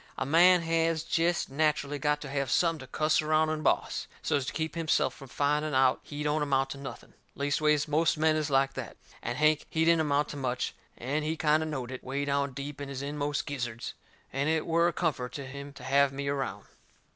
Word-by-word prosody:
A - - -1
man 175 +4 +6
has 165 -1 +1
jest 165 -2 0
naturally 145 -1 0
got 150 0 +1
to 145 - -6
have 140 -1 -1
something 165 -2 +2
to 130 - -10
cuss 155 +3 +2
around 155 0 +2
and 155 0 -2
boss, - - 0 0.2
so's 140 -3 0
to - - -1
keep 160 0 -2
himself 165 -2 +1
from 135 - -12
finding 150 +3 0
out 130 -1 +4
he 150 0 -6
don't 150 +1 +1
amount 135 -2 +1
to 140 - -6
nothing. 140 - -9 0.2
Leastways, 145 +1 +1
most 155 +2 +2
men 155 0 +3
is 155 -1 -1
like 135 0 +2
that. - - -7 0.2
And 120 - -3
Hank, 155 0 +3
he 160 0 +1
didn't 165 -1 +4
amount 145 -1 +1
to 145 - -6
much; 130 -2 -2 0.2
and 140 +5 -2
he 160 +1 -2
kind 155 0 +3
o' 160 - -2
knowed 130 -5 -4
it, 130 - -7
way 140 +2 -2
down 140 -1 0
deep 140 +2 -6
in 140 - -5
his 135 0 -5
inmost 145 0 -2
gizzards, 120 -5 -4 0.4
and 140 +3 0
it 160 -1 +1
were 170 +1 +3
a 175 - 0
comfort 125 -7 -1
to 140 - -5
him 140 +2 -8
to - - -12
have 140 +1 +3
me 140 +1 -3
around. 140 -2 -3
145 Hz, 220 wpm, -29 LUFS, 140-155 Hz, 0.4 s, man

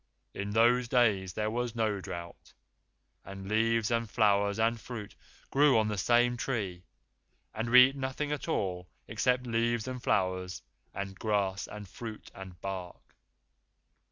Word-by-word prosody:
In 100 +1 -4
those 120 +3 +3
days 105 -7 +2
there 105 +3 -1
was 120 0 -2
no 110 -3 0
drought, 85 -2 -8 0.7
and 95 0 -9
leaves 115 +1 +1
and 115 -1 0
flowers 100 -2 +2
and 115 +1 +1
fruit 110 -4 -7 0.4
grew 140 -2 +5
on 110 -1 +2
the 105 - -2
same 120 +3 +3
tree, 100 -9 -3 0.7
and 115 +2 -3
we 125 +1 +9
ate 135 - -10
nothing 135 +2 -3
at 150 - -3
all 90 - -2 0.2
except 125 0 +1
leaves 115 0 0
and 130 -1 -5
flowers 95 -4 -1 0.3
and 100 -1 -6
grass 100 -3 0
and 105 -1 -9
fruit 110 +3 -9
and 95 -2 -10
bark." 95 -2 -7
110 Hz, 145 wpm, -30 LUFS, 95-120 Hz, 0.7 s, we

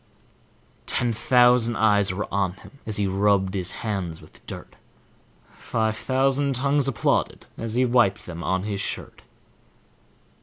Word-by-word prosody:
Ten 120 -2 0
thousand 120 0 +4
eyes 105 -3 +3
were 95 +3 -3
on 95 -2 +1
him 140 +7 -16
as 110 - +1
he 105 - +1
rubbed 95 0 +2
his 95 -2 -1
hands 95 -7 -3
with - - -18
dirt; - - -9 0.8
Five 110 -1 -2
thousand 135 +3 +1
tounges 140 +2 +1
applauded 135 - 0
as 115 0 -5
he 130 +1 +3
wiped 120 -5 +2
them 85 -1 -7
on 95 0 0
his 100 -1 -3
shirt. - - -5
110 Hz, 140 wpm, -24 LUFS, 100-125 Hz, 0.8 s, thousand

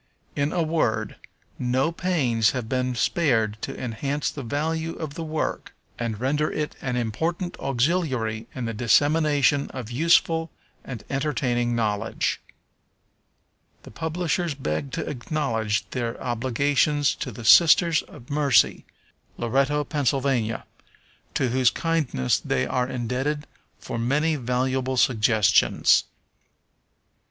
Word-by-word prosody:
In 145 +1 0
a 175 - +1
word, 115 -10 0 0.4
no 130 +5 +1
pains 135 -12 +1
have 120 -3 -4
been 125 +1 -1
spared 110 -6 +1
to 135 - -5
enhance 135 +4 -2
the 145 - -7
value 160 +6 -2
of 155 -3 -6
the 165 +1 -5
work, 155 -1 -3 0.2
and 115 -3 -3
render 150 +4 0
it 150 -1 -3
an 125 -2 -2
important 160 - -2
auxiliary 130 -5 0
in 125 -2 -3
the 115 - -3
dissemination 145 +4 +3
of 125 -3 -7
useful 165 +3 +3 0.3
and 120 -6 -7
entertaining 125 -4 0
knowledge. 110 -1 -1 1.4
The - - -12
publishers 165 - -2
beg 130 - -3
to - - -3
acknowledge 115 -6 -2
their 120 -2 -3
obligations 135 +4 +1
to 130 - -4
the 115 +1 -9
Sisters 165 +4 +6
of 120 - -14
Mercy, 145 -3 +3 0.5
Loretto, 135 +5 +1
Pa., 145 0 -3
to 130 -1 -3
whose 125 0 +3
kindness 150 - 0
they 65 - -1
are 125 -1 0
indebted 130 +5 -2 0.3
for 115 - -5
many 150 +7 +1
valuable 130 0 -1
suggestions. 110 -4 +3
130 Hz, 115 wpm, -24 LUFS, 120-150 Hz, 1.4 s, Sisters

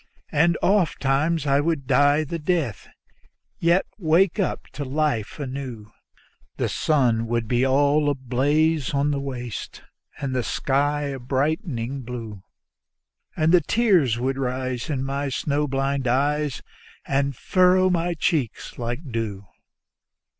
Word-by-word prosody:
And 165 +2 +3
oftentimes 160 -5 +1
I 140 0 +3
would 150 -2 -1
die 145 +4 +4
the 165 +3 -4
death, 150 - -1 0.7
yet 170 +3 +3
wake 175 +3 +3
up 195 - -1
to 145 - -4
life 140 -4 -1
anew; 130 -6 -6 0.7
The - - 0
sun 120 -7 +1
would 115 -1 -1
be 120 +2 +1
all 145 +2 +3
ablaze 145 +3 +1
on 140 +1 +2
the 140 - -1
waste, 125 -5 -6 0.4
and 135 -3 -3
the 125 - +1
sky 145 +4 0
a 140 -2 -4
blighting 135 - -2
blue, 115 -5 -7 1.0
And 155 +1 +3
the 180 -1 +6
tears 175 - +2
would 130 +2 -1
rise 130 +1 -3
in 135 -3 -1
my 140 +1 -2
snow 145 +2 -1
blind 135 0 -1
eyes 145 +3 0 0.4
and 140 0 0
furrow 185 +5 +3
my 175 0 0
cheeks 145 -8 -2
like 120 +5 -3
dew. 105 -4 -3
140 Hz, 130 wpm, -24 LUFS, 130-155 Hz, 1.0 s, the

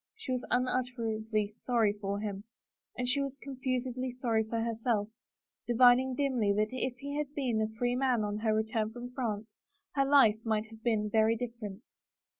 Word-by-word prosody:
She 440 -12 -6
was 250 -1 -1
unutterably 225 -4 0
sorry 230 -5 +2
for 200 -1 -3
him. 205 -2 -4 0.5
And 250 - -1
she 255 +3 +1
was 275 -1 -3
confusedly 255 -2 -3
sorry 235 -3 +1
for 225 +1 -3
herself, 225 -2 0 0.6
divining 250 +2 +5
dimly 250 -7 +1
that 215 +1 +1
if 255 -1 -2
he 280 +2 -6
had 295 -1 -4
been 245 -6 0
a 215 - +1
free 245 0 +1
man 250 -4 +2
on 210 0 -2
her 220 0 +1
return 220 0 0
from 245 +1 -8
France 225 -5 -2 0.5
her 275 -1 +2
life 270 -7 +6
might 220 -1 0
have 225 0 -13
been 220 -3 +1
different. 225 0 0
235 Hz, 165 wpm, -31 LUFS, 215-255 Hz, 0.6 s, life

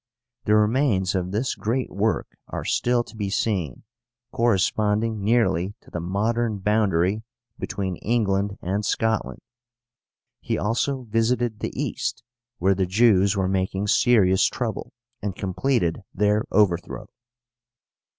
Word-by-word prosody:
The 105 - +4
remains 105 -3 +2
of 90 -2 -1
this 110 +7 -1
great 120 +4 -2
work 110 +3 -1
are - - -5
still 120 0 +1
to 115 - -15
be 105 -2 -3
seen, 95 - -1 0.5
corresponding 110 -1 +1
nearly 100 -4 +1
to - - -19
the 85 - -3
modern 110 +5 -1
boundary 100 -1 +1 0.4
between 95 -4 -3
England 100 -3 0
and 100 +4 -1
Scotland. 110 +1 -1 1.0
He - - -2
also 125 +5 -1
visited 115 0 0
the - - -3
East, - - -3 0.3
where 95 +3 +3
the 95 -1 0
Jews 100 -1 +4
were 95 -1 +1
making 95 +1 -1
serious 95 -7 +4
trouble, - - -3 0.3
and 100 -2 -3
completed 95 -1 0
their 105 +2 +2
overthrow. 95 -4 +1
105 Hz, 120 wpm, -24 LUFS, 95-115 Hz, 1.0 s, The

